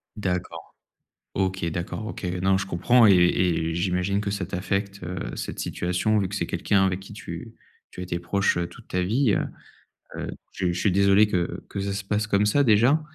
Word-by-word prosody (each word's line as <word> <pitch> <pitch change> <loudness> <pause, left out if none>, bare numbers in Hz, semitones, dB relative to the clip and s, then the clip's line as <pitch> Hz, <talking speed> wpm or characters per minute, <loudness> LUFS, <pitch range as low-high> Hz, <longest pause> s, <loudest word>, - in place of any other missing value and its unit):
D'accord. 90 -5 -4 0.6
OK, 95 -2 -1
d'accord. 90 +6 -4
OK. 110 - -7 0.2
Non 95 0 +3
je 95 - -3
comprends 115 +7 +4
et 100 - +7
et 90 -2 +2
j'imagine 90 +3 0
que 100 -1 -2
ça 100 -2 -2
t'affecte, 100 +2 -3
heu, 90 0 -5
cette - - -5
situation, 90 +5 0
vu 100 -2 0
que 100 - -6
c'est 85 - -1
quelqu'un 95 +3 +2
avec 95 0 -1
qui 95 - -12
tu - - -8 0.4
tu - - -9
as - - -3
été 85 -1 -3
proche 85 +2 +1
toute - - -15
ta 90 - 0
vie, 115 +5 +2
heu - - 0 0.7
heu, - - -4 0.3
je 90 -2 0
je 90 - -3
suis 100 - +2
désolé 100 +2 +5
que 90 -4 -2
que - - -5
ça 100 0 -2
se 100 0 -4
passe 105 +1 -1
comme 100 0 +2
ça 140 +7 +3
déjà. 120 +6 +4
95 Hz, 200 wpm, -25 LUFS, 90-105 Hz, 0.7 s, et